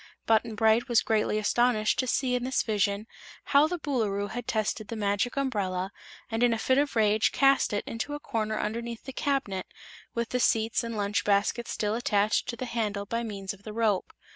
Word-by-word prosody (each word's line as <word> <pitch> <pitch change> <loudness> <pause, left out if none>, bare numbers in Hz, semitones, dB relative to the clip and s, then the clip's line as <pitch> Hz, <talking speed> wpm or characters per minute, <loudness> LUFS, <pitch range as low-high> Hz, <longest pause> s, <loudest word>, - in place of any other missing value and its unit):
Button 225 0 +2
Bright 220 +2 +3
was 235 -2 +4
greatly 215 -1 +1
astonished 215 0 +2
to 255 - +1
see 250 +1 +1
in 250 -1 0
this 260 +1 0
vision 205 -1 0 0.4
how 285 +2 +4
the 355 +2 -3
Boolooroo 215 - -1
had 245 +1 -5
tested 215 -1 -1
the 230 - -5
Magic 205 +4 0
Umbrella 195 -8 -1 0.4
and 225 +1 -1
in 245 -1 +4
a - - 0
fit 260 +4 +2
of 285 -2 0
rage 215 -1 +3
cast 275 0 +3
it 205 - -1
into 235 +6 -4
a - - -6
corner 220 -6 -2
underneath 230 +2 -4
the 265 - -8
cabinet, 255 -12 -1 0.5
with 235 -1 -1
the 250 - -1
seats 225 0 +2
and 230 -1 -4
lunch 205 0 0
basket 210 +4 +1
still 210 0 -1
attached 215 -2 +1
to 240 - -2
the 255 - -5
handle 210 -4 -2
by 230 +3 -2
means 200 -4 -5
of 200 - -16
the 215 +1 -8
rope. 215 -4 0
225 Hz, 200 wpm, -28 LUFS, 210-245 Hz, 0.5 s, was